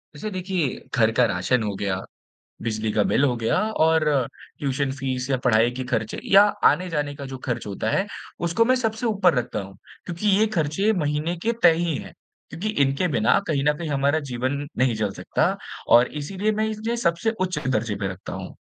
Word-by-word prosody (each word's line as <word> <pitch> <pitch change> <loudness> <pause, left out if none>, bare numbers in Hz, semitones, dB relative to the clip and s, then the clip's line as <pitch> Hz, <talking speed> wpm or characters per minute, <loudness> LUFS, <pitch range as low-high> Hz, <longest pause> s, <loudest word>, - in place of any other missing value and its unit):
वैसे 185 +9 -5
देखिए, 185 -6 -2 0.2
घर 115 -3 +4
का 125 +2 +3
राशन 115 +4 0
हो 105 -1 -2
गया, 95 -1 -2 0.6
बिजली 110 -1 -2
का 105 - +2
बिल 140 - +2
हो 125 -3 +1
गया, 115 -1 0
और 160 -5 +3 0.5
ट्यूशन 140 -1 -1
फीस 130 -1 -2
या 135 - +3
पढ़ाई 115 -1 +4
के 130 - -2
खर्चे, 115 -4 -2
या 195 +1 +7 0.3
आने-जाने 150 -5 -2
का 140 -1 -8
जो 135 -1 -7
खर्च 120 -3 -2
होता 105 +2 -2
है, 195 - +1 0.3
उसको 170 +7 +2
मैं 255 +2 +4
सबसे 225 -1 -1
ऊपर 200 -6 +3
रखता 125 -4 -2
हूँ 95 0 -11 0.3
क्योंकि 180 +4 -2
ये 220 - +4
खर्चे 160 +8 +1
महीने 155 -1 -1
के 230 - +1
तय - - +8
ही 170 -3 0
हैं। - - -8 0.4
क्योंकि 195 +6 -4
इनके 140 +6 +1
बिना 115 -6 +3
कहीं 145 -4 0
न 150 - +4
कहीं 165 +1 -5
हमारा 140 +2 +2
जीवन 130 +4 -2
नहीं 130 -1 +3
चल 105 -2 -1
सकता, - - 0 0.3
और 120 +1 +7 0.2
इसीलिए 195 +8 -1
मैं 215 +1 0
इस 215 -1 -6
ने 235 +1 0
सबसे 195 -1 +1
उच्च 185 -1 0
दर्जे 115 -4 0
पे 100 -1 -2
रखता 95 0 -8
हूँ। - - -7
145 Hz, 200 wpm, -24 LUFS, 120-180 Hz, 0.6 s, तय